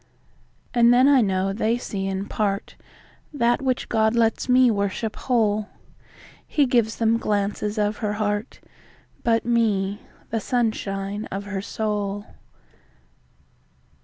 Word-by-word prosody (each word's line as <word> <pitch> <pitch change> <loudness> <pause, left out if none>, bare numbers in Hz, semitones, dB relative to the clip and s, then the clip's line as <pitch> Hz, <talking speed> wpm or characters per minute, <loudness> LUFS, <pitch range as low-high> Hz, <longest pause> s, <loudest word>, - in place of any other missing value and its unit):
And 240 -1 +5
then 250 +2 +5
I 280 -3 +6
know 195 -2 0
they 225 +3 0
see 195 -5 -4
in 195 0 -2
partThat 235 +5 -3
which 260 -2 -1
God 220 0 +2
lets 230 +2 +1
me 250 -1 +5
worship 200 +1 -2
whole:He 220 +5 -2
gives 235 -3 +1
them 230 0 +2
glances 205 0 -1
of 210 0 0
her 210 -1 -2
heart, 210 +1 -2 0.6
But 230 -1 +2
me, 210 -4 +1 0.3
the 225 - 0
sunshine 205 -3 -2
of 195 +1 -5
her 200 -1 -4
soul. 205 -1 -3
215 Hz, 115 wpm, -23 LUFS, 205-235 Hz, 0.6 s, I